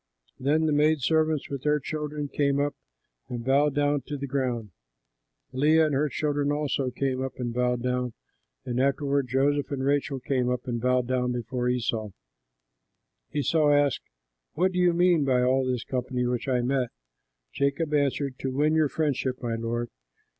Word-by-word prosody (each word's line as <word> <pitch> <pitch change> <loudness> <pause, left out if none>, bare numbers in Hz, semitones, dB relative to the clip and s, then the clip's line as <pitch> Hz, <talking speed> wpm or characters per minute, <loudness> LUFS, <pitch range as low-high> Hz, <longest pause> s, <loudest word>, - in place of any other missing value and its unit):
Then 150 +4 +2
the 155 - +2
maid 150 +1 +3
servants 155 +1 +1
with 140 -2 -5
their 150 +1 +2
children 150 0 -4
came 140 0 +1
up 145 0 0 0.6
and 120 -1 -5
bowed 140 +2 +3
down 145 -1 +2
to 145 - -4
the 140 - -4
ground. 125 -6 -2 0.8
Leah 155 +5 +4
and 150 - -1
her 145 +2 +1
children 145 0 0
also 145 -3 -1
came 130 +1 -2 0.2
and 120 -2 -3
bowed 125 0 0
down, 125 -1 -1 0.5
and 125 -1 -2
afterward 140 0 +1
Joseph 140 +3 +1
and 140 -3 -3
Rachel 140 -1 0
came 125 -1 0
up 125 +1 -2
and 120 -2 -2
bowed 125 0 +2
down 125 0 0
before 125 +1 -2
Esau. 115 -3 -1 1.2
Esau 150 +1 +2
asked, 145 -2 +3 0.5
"What 185 +4 +2
do 180 - -2
you 180 -1 +5
mean 175 -2 +3
by 130 -2 +2
all 130 +1 +2
this 125 -2 -1
company 125 -1 -2
which 125 +2 -2
I 125 -2 +2
met?" 125 0 0 0.6
Jacob 140 +3 0
answered, 140 -2 0
"To 135 - -2
win 145 +4 +1
your 155 -2 +3
friendship, 135 -4 -1
my 120 -1 -1
lord." 115 +1 -3
135 Hz, 170 wpm, -27 LUFS, 125-145 Hz, 1.2 s, you